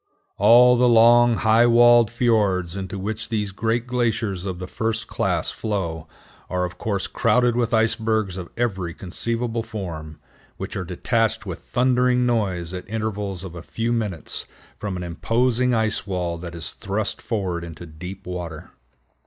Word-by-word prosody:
All 125 +1 +7
the 125 +1 +4
long 120 +1 +6
high 110 +2 +4
walled 120 -1 +6
fiords 105 -7 +1
into 95 0 -5
which 110 +3 -4
these 105 -3 -1
great 115 +4 -1
glaciers 115 -6 -1
of 95 -2 -3
the 90 - -5
first 110 +3 -2
class - - -1
flow 85 -7 -3 0.4
are 90 0 0
of 90 0 -8
course 100 -3 -1
crowded 125 -1 +2
with 120 -1 0
icebergs 110 -3 +1
of 90 -2 -7
every 95 -8 -2
conceivable 115 +5 -2
form, 85 -9 -7 0.4
which - - -6
are 100 - -2
detached 110 +5 0
with 90 -3 -5
thundering 125 0 +2
noise 95 -8 0
at 90 +1 -7
intervals 105 -4 -3
of 95 -3 -7
a 85 - -8
few 115 +7 -2
minutes 105 -9 -3 0.3
from 100 -3 -3
an 90 - -5
imposing 120 +8 +1
ice 110 -2 0
wall 90 -3 -2
that 85 0 -7
is 80 -4 -4
thrust 100 +2 -3
forward 95 -7 -2
into 85 0 -9
deep 90 +5 -9
water. 85 -3 -6
105 Hz, 155 wpm, -23 LUFS, 90-115 Hz, 0.4 s, All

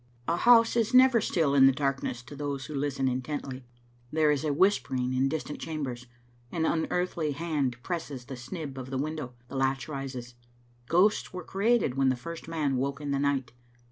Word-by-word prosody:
A 165 - +2
house 230 +4 +6
is 235 +1 +2
never 255 -2 +7
still 160 -8 +1
in 135 -1 +7
darkness 135 -3 -2
to 145 - -11
those 140 -2 -4
who 155 - -7
listen 140 -1 -1
intently; 130 0 -4 0.4
there 155 -1 +3
is 145 0 0
a 155 - 0
whispering 140 -7 +1
in 130 +1 +2
distant 150 0 -4
chambers, 130 -6 -4 0.4
an 160 -2 0
unearthly 165 -1 0
hand 145 -5 -1
presses 150 -8 -4
the 135 - -8
snib 135 +2 -6
of 130 0 -7
the 135 - -2
window, 145 -3 -4
the 135 - -9
latch 135 0 0
rises. 135 -4 -6 0.5
Ghosts 185 +8 +3
were 180 -1 -5
created 200 - +1
when 135 -1 +4
the 130 - +2
first 170 +7 -8
man 150 -5 0
woke 140 +2 -1
in 145 -1 -4
the 140 - +1
night. 140 -2 0
140 Hz, 180 wpm, -28 LUFS, 135-165 Hz, 0.5 s, never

